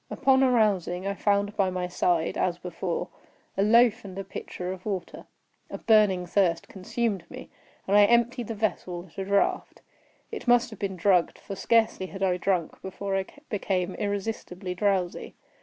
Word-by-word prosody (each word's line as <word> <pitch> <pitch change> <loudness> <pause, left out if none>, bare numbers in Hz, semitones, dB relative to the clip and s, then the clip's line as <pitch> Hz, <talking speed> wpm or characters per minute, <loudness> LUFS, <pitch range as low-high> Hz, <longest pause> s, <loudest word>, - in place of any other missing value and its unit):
Upon 270 0 +3
arousing, 205 -7 +2
I 200 - -1
found 205 0 0
by 195 -3 +2
my 180 -1 -2
side, 175 -2 0
as 175 -1 0
before, 180 0 -4 0.5
a 195 - 0
loaf 230 +2 +4
and 190 -2 -9
a 195 - -3
pitcher 180 -1 -6
of 185 -1 -8
water. 195 -4 -5 0.4
A - - -5
burning 210 -5 +3
thirst 175 -2 +1
consumed 200 0 -2
me, - - -10 0.4
and 195 - +2
I 205 0 +8
emptied 235 +1 +2
the 225 - -4
vessel 185 -4 -2
at - - -10
a 190 - -2
draught. 200 0 0 0.5
It 440 - -7
must 240 -1 +4
have 220 - -10
been 195 -2 -3
drugged—for 185 +1 +1
scarcely 220 -1 +2
had 195 +1 -6
I 180 -2 +2
drunk, 180 -3 -1
before 195 +1 -4
I 190 0 -1 0.2
became 190 -3 -1
irresistibly 200 -2 -4
drowsy. 185 -2 -1
195 Hz, 165 wpm, -27 LUFS, 180-215 Hz, 0.5 s, I